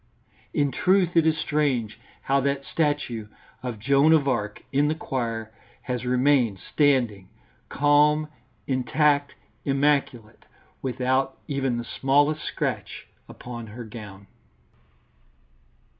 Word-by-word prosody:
In 145 -1 +1
truth 180 +5 +2
it 165 -1 +5
is 160 -1 +2
strange 140 -8 -1 0.2
how 140 +1 +2
that 140 0 -1
statue 145 -8 -1 0.3
of 125 -3 -4
Joan 140 +7 +4
of 150 -3 +3
Arc 105 -5 -2
in 145 +2 +2
the 155 - 0
choir 115 -7 -3 0.3
has 125 -1 -3
remained 125 -4 +3 0.2
standing 120 -10 +2 0.4
calm, 150 +1 +3 0.4
intact, 140 +2 +1 0.3
immaculate, 135 -5 0 0.4
without 130 +1 0
even 135 -4 -1
the 120 - -3
smallest 145 +5 +1
scratch - - -4 0.2
upon 120 -2 -8
her 115 +3 -8
gown. 105 -3 -10
135 Hz, 110 wpm, -25 LUFS, 120-145 Hz, 0.4 s, it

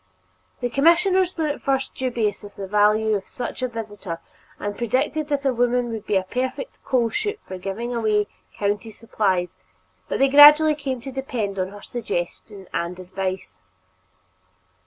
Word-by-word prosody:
The 245 - 0
commissioners 355 +6 +3
were 320 - 0
at 295 -1 -2
first 270 -1 0
dubious 235 -6 -1
of 205 - -11
the 195 - -5
value 210 +2 +3
of 195 -2 -2
such 245 +1 -6
a 255 - +1
visitor 205 -7 -6 0.4
and 205 0 -4
predicted 270 +6 0
that 285 -2 -1
a 265 - +3
woman 245 0 +1
would 220 -2 -6
be 205 - +1
a 190 - +3
perfect 255 - -4
"coal 240 -3 +1
chute" 425 0 -2
for 185 0 -6
giving 215 +6 -4
away 215 -3 +2 0.3
county 205 +2 -1
supplies, 200 -5 -1 0.6
but - - 0
they 275 - +4
gradually 295 +2 +9
came 270 -4 -4
to 270 +2 -7
depend 240 -7 -3
upon 185 +1 -1
her 205 0 -11
suggestion 200 -3 -5
and 170 +2 -2
advice. 185 - -5
230 Hz, 160 wpm, -23 LUFS, 200-270 Hz, 0.6 s, gradually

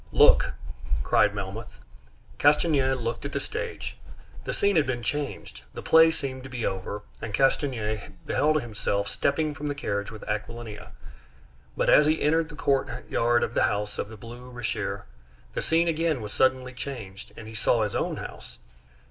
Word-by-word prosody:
"Look!" - - +6 0.5
cried 105 -1 +3
Melmoth. 100 +3 -6 0.6
Castanier 145 -2 +4
looked 120 -2 -3
at 140 0 -5
the 140 - 0
stage. 475 - -5 0.5
The - - -1
scene 200 -1 +2
had 155 -4 +4
been 120 -2 -2
changed. 145 +3 -3
The - - -6
play 160 0 +7
seemed 135 -5 -4
to 130 - -9
be 125 -3 -3
over, 95 +2 -3 0.2
and 110 -2 -2
Castanier 120 -6 +1 0.2
beheld 155 +1 +2
himself 100 -3 -1
stepping 155 +7 0
from 150 +1 -5
the 145 - -2
carriage 100 -7 -2
with 110 -1 -10
Aquilina; 110 0 -5 0.8
but - - +1
as 150 - +7
he 155 +1 +3
entered 160 +2 +2
the 150 - -10
courtyard 120 -4 +1
of - - -2
the - - +2
house 105 0 0
in 100 - -2
the 110 - -10
Rue 120 +3 -10
Richer, 120 -2 -3 0.5
the - - -1
scene 165 +1 +2
again 165 -3 +1
was 105 -2 -6
suddenly 130 -1 +2
changed, 115 -7 -7
and 110 - -8
he 110 - -9
saw 110 +1 +2
his 105 - -2
own - - -1
house. - - -9
125 Hz, 170 wpm, -27 LUFS, 110-145 Hz, 0.8 s, play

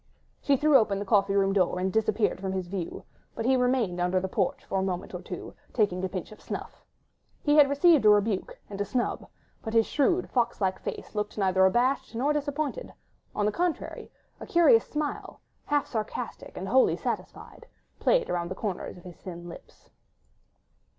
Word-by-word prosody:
She 280 -1 +3
threw 300 0 +5
open 205 -3 0
the 200 - -4
coffee 200 -1 +2
room 195 -1 +3
door 185 -2 +2
and 185 +1 -1
disappeared 215 -2 +1
from 190 -1 -2
his 190 -1 -2
view, 180 -2 -5 0.3
but 225 - -3
he 260 +1 +4
remained 250 -8 +1
under 180 +1 +1
the 190 - -3
porch 190 -1 -1
for 195 - -1
a - - 0
moment 185 -2 -3
or - - -5
two, - - -7 0.2
taking 195 -5 +1
a 190 - -1
pinch 185 0 -5
of 215 - -13
snuff. - - -7 0.6
He 295 0 +3
had 290 -2 +7
received 295 0 +5
a - - +8
rebuke 205 -1 +2
and 200 -1 -6
a - - +3
snub, 240 +5 -2 0.3
but 220 0 -5
his 225 -1 +5
shrewd, 345 +5 +1
fox 240 -2 0
like 190 -2 0
face - - -6
looked 210 0 -3
neither 190 -2 +3
abashed 245 +4 +1
nor 275 +6 +1
disappointed; 295 - -3 0.4
on 205 - +1
the 210 - +2
contrary, 345 +7 -3 0.3
a - - -8
curious 345 +7 +5
smile, 300 -1 -4 0.3
half 290 -1 +1
sarcastic 220 +1 -5
and 190 - -4
wholly 260 +6 +4
satisfied, - - -6 0.3
played - - +2
around 170 -1 -2
the 185 - -4
corners 190 -3 -4
of 175 - -14
his 175 -3 -11
thin 175 -2 -8
lips. 170 - -13
210 Hz, 190 wpm, -27 LUFS, 190-265 Hz, 0.6 s, a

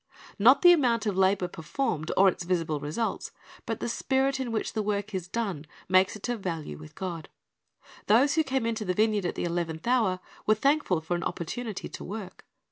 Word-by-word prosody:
^ - - -25 0.2
Not 250 - +6
the 350 - +10
amount 240 -8 +2
of 205 -3 0
labor 190 -1 +2
performed, 160 - -3
or 195 - +7
its 185 - +1
visible 165 -4 -1
results, 155 +11 -3 0.4
but 225 -2 -2
the - - -3
spirit 265 +3 0
in 255 -3 -3
which 220 - -2
the 220 - 0
work 205 0 -2
is 185 -2 -3
done, 185 -8 -3 0.2
makes 185 +2 +4
it 215 - -6
of 240 -2 -2
value 165 - -5
with 75 0 -12
God. 170 -5 -5 0.8
Those 255 +7 +5
who 320 - +3
came 265 -4 -1
into 225 -1 -1
the 180 -3 -1
vineyard 210 -3 +2
at - - -4
the - - -3
eleventh 170 -2 -3
hour 225 -7 +2 0.3
were 215 - +5
thankful 275 - +1
for 160 +2 -3
an 175 - -3
opportunity 215 +5 -4
to - - -8
work. 200 -1 -7
200 Hz, 205 wpm, -28 LUFS, 175-235 Hz, 0.8 s, the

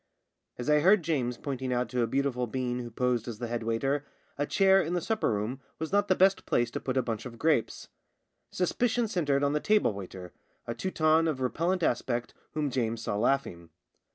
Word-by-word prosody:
As 120 - -5
I 150 0 +5
heard 190 +4 +5
James 125 -7 -1
pointing 130 -1 -4
out 125 0 0
to 125 -1 -1
a 115 - +2
beautiful 130 -2 0
being 125 +1 -2
who 120 -1 -5
posed 125 0 0
as 115 -3 -5
the 120 - -4
head 120 0 -3
waiter, 135 +6 0 0.3
a 145 +1 -2
chair 195 -1 +4
in 170 +1 -2
the - - +2
supper 220 +5 0
room 110 +5 -2 0.2
was 160 0 -4
not 205 +1 +2
the 185 - +3
best 190 +1 +3
place 120 -1 +1
to - - -3
put 130 0 -2
a 130 - +3
bunch 115 +1 -4
of 115 -1 -11
grapes. 150 -3 0 0.6
Suspicion 235 +6 0
centred 145 -8 0
on 140 0 +2
the 150 - +1
table 210 - +2
waiter, 95 -2 -8 0.3
a 115 - -3
Teuton 160 0 +2
of 150 -5 -1
repellent 170 +8 0
aspect 120 -2 -1 0.2
whom 150 -3 -1
James 115 -2 -1
saw - - -2
laughing. 105 -8 0
130 Hz, 205 wpm, -29 LUFS, 120-160 Hz, 0.6 s, I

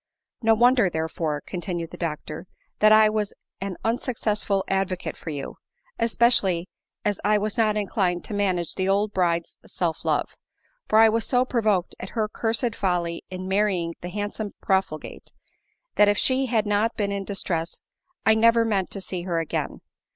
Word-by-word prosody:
* - - -62
" - - -57
No 225 -1 +4
wonder, 240 -3 +4
therefore," 160 -2 -2
continued 175 -2 -5
the - - -8
doctor, 155 0 -5
* - - -43
that 215 0 +6
I 215 0 +7
was 215 -1 -1 0.3
an 195 -2 -4
unsuccessful 215 -4 0
advocate 190 -1 -1
for - - -8
you— 145 -3 -5 0.4
especially 220 -7 +3 0.4
as 205 -2 0
I 210 +1 +4
was 210 0 -2
not 215 -2 +2
inclined 190 -3 0
to - - -7
manage 185 -5 0
the 190 0 -1
old 205 +2 +1
bride's 170 -2 0
self 165 -3 -2
love; - - 0 0.5
for 215 - +3
I 225 0 +8
was 225 -1 0
so 250 0 +3
provoked 215 -8 +1
at 190 - -6
her 215 -1 +2
cursed 225 +2 -1
folly 175 -3 -1
in 185 0 -6
marrying 190 -4 +1
the 175 - -5
handsome 205 +2 -4
profligate, 190 -5 -2 0.7
that 210 - +6
if 205 - +2
she 260 +3 +2
had 225 -3 +1
not 210 +2 +1
been 205 -2 0
in 200 -1 -2
distress, 175 -4 -3 0.5
I 220 - +6
never 230 +1 +4
meant 200 -4 0
to 195 - -5
see 185 -1 -3
her 175 -1 -2
again. 165 -1 -3
200 Hz, 175 wpm, -25 LUFS, 180-220 Hz, 0.7 s, I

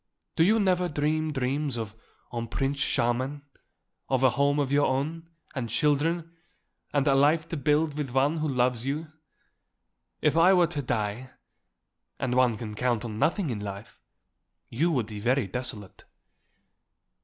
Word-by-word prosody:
Do 160 - +4
you 215 +6 +4
never 180 -3 +2
dream 155 +1 0
dreams 135 0 -1
of 110 -2 -5 0.4
un 115 -1 -3
prince 135 +4 -2
charmant; 130 +3 0 0.7
of 130 -1 +1
a 130 - +6
home 140 +3 +2
of 140 -2 0
your 145 +1 +3
own, 155 +5 -2 0.2
and 125 -4 -3
children, 165 +4 0 0.6
and 145 -1 +1
a 140 - +5
life 150 +4 +3
to - - -3
build 150 +1 +1
with 150 -3 -3
one 135 +5 +2
who 155 0 -1
loves 125 -3 +1
you? 150 +4 -3 1.1
If - - +2
I 170 +3 +6
were 180 -2 +5
to 150 -2 -3
die 120 0 -2 0.9
and 125 - -1
one 125 -3 +3
can 105 -1 -6
count 120 +1 0
on 110 -2 -5
nothing 170 - +1
in 110 - -3
life 100 +1 -8 0.7
you 165 +9 +1
would 125 -8 0
be 105 -1 -8
very 125 +4 +1
desolate." 105 -1 -6
135 Hz, 155 wpm, -27 LUFS, 120-155 Hz, 1.1 s, a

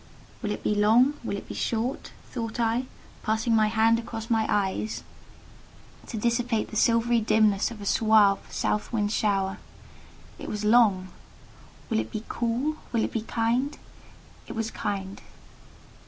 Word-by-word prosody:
"Will 210 - -2
it 210 - -4
be - - +1
long—will 230 +3 +3
it - - -9
be - - -6
short?" 235 +4 -2 0.2
thought 230 -2 -4
I, 235 +2 +1 0.4
passing 220 +1 +1
my 215 -1 +4
hand 225 +1 +3
across 225 0 -6
my 220 -1 +2
eyes 205 +1 -1 1.0
to 230 - -5
dissipate 235 0 0
the - - -7
silvery 230 +1 +3
dimness 215 -2 +3
of 230 -2 -9
a - - -6
suave, 215 -1 +4
south 210 - -1
wind 210 -3 0
shower. 195 -3 0 0.8
It - - -6
was 210 0 -3
long. 210 -5 +4 0.8
"Will - - +2
it 110 0 -3
be 215 - -4
cool?—will 240 0 -1
it - - -2
be 225 - -2
kind?" 235 +6 -1 0.7
It - - -6
was 225 0 -2
kind. 195 -1 -4
220 Hz, 145 wpm, -26 LUFS, 210-235 Hz, 1.0 s, my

